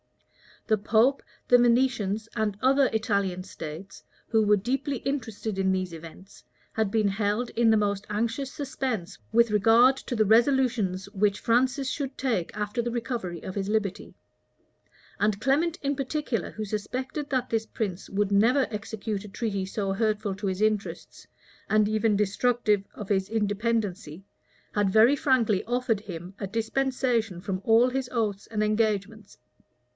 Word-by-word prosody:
The 215 -2 +2
pope, 225 +6 +3 0.3
the 245 - +7
Venetians, 235 -4 +2
and 215 -3 -1
other 270 +1 +4
Italian 200 -5 0
states, 170 0 -9 0.2
who 220 -1 +3
were 210 0 +4
deeply 265 +6 -2
interested 225 -6 -4
in 190 0 +2
these 185 -2 -2
events, 165 +4 -12 0.3
had 220 -2 0
been 215 0 +2
held 205 +4 -1
in 230 -1 +3
the 220 - +5
most 205 -1 -1
anxious 235 +6 -2
suspense 255 - -4
with 235 0 +4
regard 230 +5 +5
to 255 - -5
the 215 -1 +3
resolutions 225 -5 +2
which 205 0 +1
Francis 255 +3 +1
should 275 -2 -4
take 230 -11 -1
after 210 +3 -2
the 240 - -2
recovery 230 -7 -4
of 185 - -6
his 195 0 -3
liberty; 210 -3 -2 1.0
and 210 -1 +1
Clement, 310 +6 +1
in 280 0 0
particular, 270 - -2
who 215 - -5
suspected 255 +8 -4
that 255 -2 -1
this 225 -1 0
prince 195 -4 -4
would 205 0 0
never 240 +7 +4
execute 210 -1 -4
a - - -8
treaty 200 -2 -3
so 195 0 -2
hurtful 210 -1 0
to 195 +1 -4
his 190 +1 -2
interests, 215 -1 -2 0.4
and 215 -1 +4
even 215 0 +2
destructive 210 +1 +1
of 210 - -8
his 190 -1 +1
independency, 210 -5 -1 0.5
had 205 -2 +2
very 225 +7 +6
frankly 240 -8 +2
offered 245 -2 0
him 180 -2 -8
a 195 - -3
dispensation 230 -2 -1
from 190 -1 -3
all 230 +3 +5
his 260 0 -3
oaths 215 -5 -2
and 215 -1 -1
engagements. 215 -1 -1
215 Hz, 150 wpm, -27 LUFS, 200-245 Hz, 1.0 s, the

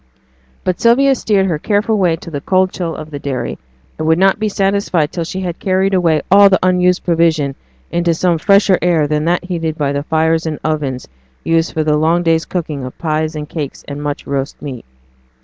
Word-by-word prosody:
But 185 -1 -2
Sylvia 270 +4 +4
steered 205 -6 +1
her 165 -5 -1
careful 210 +5 +1
way 180 -5 +2
to 165 +1 -11
the 145 -2 -4
cold 185 +2 +2
chill 170 -3 -4
of 155 0 -9
the 145 - -5
dairy, 130 -4 -4 0.4
and 155 - -2
would 160 0 +4
not 195 +2 +3
be 215 0 0
satisfied 195 -6 0
till 170 - -3
she 190 +3 -5
had 175 -2 -4
carried 190 +1 +1
away 165 -5 +2
all 200 +1 +8
the 190 - +4
unused 180 0 +2
provision 165 -5 +1 0.4
into 170 -1 +1
some 170 -1 +1
fresher 200 +1 +4
air 170 -3 +2
than 150 +1 -1
that 175 +2 0
heated 165 -3 -3
by 145 -2 0
the 140 0 -1
fires 160 +1 0
and 155 -2 -3
ovens 145 -5 -2 0.4
used 165 0 +1
for 160 - 0
the 150 -1 +2
long 165 +3 +2
day's 165 -1 +2
cooking 155 -6 -4
of 130 - -8
pies 155 0 -2
and 150 -1 -5
cakes 150 -3 -6
and 145 0 -6
much 145 -1 -4
roast 140 0 -3
meat. 130 -5 -7
165 Hz, 205 wpm, -16 LUFS, 150-185 Hz, 0.4 s, all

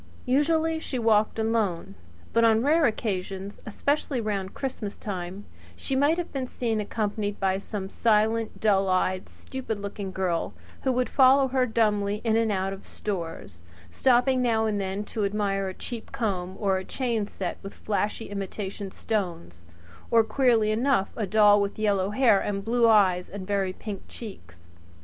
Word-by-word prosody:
Usually 320 +4 +2
she 280 -4 -4
walked 220 -2 +2
alone; 220 - 0 0.4
but 230 - +4
on 225 0 +4
rare 310 +2 +4
occasions, 195 -3 -3
especially 280 +4 -1
round 200 -4 -3
Christmas 240 -6 -4
time, 190 0 -5 0.3
she 270 - -3
might 290 +5 +3
have 350 - -4
been 265 -2 -2
seen 230 -3 -2
accompanied 205 -1 -2
by 190 -1 +1
some 200 -1 -5
silent, 220 +1 +1
dull 195 -3 +3
eyed, 185 0 0
stupid 250 -5 -6
looking 200 -1 -5
girl, 185 -3 -1 0.3
who 265 - +1
would 250 -1 +1
follow 265 +2 +5
her 255 -1 +2
dumbly 210 -3 +1
in 225 -2 +2
and 225 -1 +2
out 190 0 -1
of 195 - -11
stores, 165 - -5 0.3
stopping 255 - +3
now 225 -3 +2
and 210 -2 0
then 195 +2 -3
to 210 +1 -3
admire 200 -1 0
a 190 - -4
cheap 235 -2 -7
comb 190 -5 -2
or 195 -3 +1
a - - -6
chain 230 -2 -1
set 185 -3 -5
with 195 - -9
flashy 210 +1 -2
imitation 200 0 -5
stones 170 - -4 0.4
or, 230 -1 +5
queerly 225 -2 +2
enough, 230 -2 +1
a 215 -4 -2
doll 210 0 +5
with 200 0 -2
yellow 200 -3 +1
hair 215 -2 +4
and 200 0 -3
blue 235 +1 +3
eyes 185 -5 +4
and 200 -2 -7
very 195 -1 0
pink 200 +1 -7
cheeks. 90 - -10
210 Hz, 165 wpm, -26 LUFS, 195-230 Hz, 0.4 s, follow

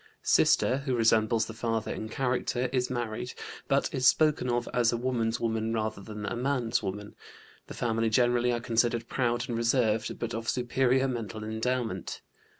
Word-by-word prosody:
Sister, 130 +2 +3
who 135 -2 -1
resembles 115 0 +3
the 115 - -8
father 115 -1 -2
in 110 - -6
character, 125 0 -1
is 125 -1 +1
married, 120 -1 -4 0.3
but 140 +4 +1
is 130 -3 +3
spoken 150 -5 +3
of 120 0 0
as 120 -2 +3
a 120 - -1
woman's 120 -2 -1
woman 110 -1 -1
rather 110 -2 -2
than 105 0 -7
a - - -3
man's 125 -2 0
woman. 105 +1 -5 0.5
The - - -8
family 115 -1 0
generally 120 +1 +3
are 120 - 0
considered 115 0 0
proud 120 -2 0
and 120 - -3
reserved, 115 -2 +1
but 115 0 -4
of 115 0 -3
superior 130 +1 +2
mental 110 -4 -4
endowment. 110 -3 -2
120 Hz, 165 wpm, -29 LUFS, 110-125 Hz, 0.5 s, Sister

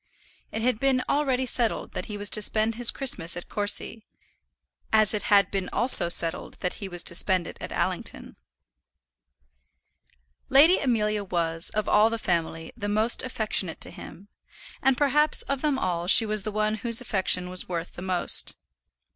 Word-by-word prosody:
It 220 - -4
had 250 -3 0
been 265 -1 +1
already 265 -3 0
settled 240 -2 -2
that - - -6
he 210 - -7
was 205 0 -3
to 215 - +5
spend 215 +2 0
his 235 +1 +4
Christmas 180 -11 -1
at 175 - -9
Courcy; 205 +2 -1 0.9
as 215 -1 +3
it 210 - -2
had 200 -1 +3
been 195 -2 -3
also 240 -8 +3
settled 165 -1 +2
that 180 - -2
he 195 - -6
was 175 -1 -2
to - - +2
spend 185 0 +1
it - - -9
at - - -7
Allington. - - -4 2.1
Lady 305 +7 +5
Amelia 215 -5 -1
was, 170 -3 -2
of 215 - -2
all 210 +2 +3
the 230 - -4
family, 165 -5 -3
the 205 - -5
most 215 +3 +1
affectionate 215 -8 -3
to - - -6
him, 195 +3 -13 0.5
and 270 -2 +2
perhaps 300 +2 +2
of 275 -1 -4
them 295 -3 0
all 175 -7 -3
she 225 - +7
was 215 -1 -1
the 215 +2 -5
one 215 +1 -1
whose 230 +1 +2
affection 190 -6 0
was 180 0 -3
worth 170 -1 -5
the - - -10
most. 185 -1 +2
210 Hz, 170 wpm, -25 LUFS, 185-240 Hz, 2.1 s, she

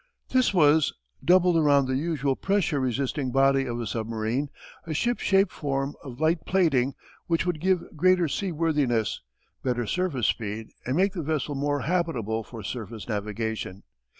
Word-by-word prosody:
This 255 -1 +3
was, 155 -4 +4 0.3
doubled 180 -1 +5
around 145 -3 +4
the 130 0 -1
usual 145 -2 0
pressure 195 -6 0
resisting 130 +1 -1
body 135 +1 +3
of 120 0 -3
a 120 - -3
submarine, 115 +5 -2 0.4
a 155 - -3
ship 240 +9 0
shape 195 -1 +3
form 135 -1 -2
of 125 -2 -9
light 160 +1 +2
plating 140 -9 +2 0.3
which 165 +1 +1
would 175 -3 -1
give 185 -1 +2
greater 180 +2 +4
seaworthiness, 150 - 0 0.4
better 125 -2 -1
surface 160 - -1
speed, 110 0 -2 0.2
and 130 +4 0
make 195 +1 +3
the 175 - -3
vessel 150 -1 -2
more 145 0 -1
habitable 135 - -1
for 115 -1 -9
surface 110 -3 -6
navigation. 105 -2 -3
140 Hz, 150 wpm, -26 LUFS, 120-170 Hz, 0.4 s, doubled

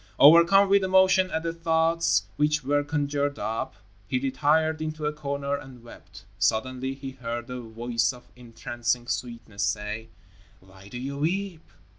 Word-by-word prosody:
Overcome 170 +7 +7
with 200 0 +4
emotion 185 0 +4
at 160 -2 -2
the 165 0 -2
thoughts 165 - +2
which 150 0 +1
were 145 +2 +1
conjured 145 -1 -1
up, 115 +1 -3 0.3
he 125 - 0
retired 155 +4 +1
into 155 -1 -4
a 150 - 0
corner 140 -1 -3
and 135 -4 -10
wept. 115 -4 -14
Suddenly 130 +6 0
he 135 0 -7
heard 120 -2 -6
a 125 0 -5
voice 115 +1 -1
of 125 -1 -15
entrancing 120 0 -3
sweetness 115 -4 -5
say, 105 +3 -2 0.5
"Why 95 +1 -17
do 110 - -8
you 140 +3 -5
weep?" 175 +2 -2
140 Hz, 150 wpm, -26 LUFS, 120-160 Hz, 0.5 s, Overcome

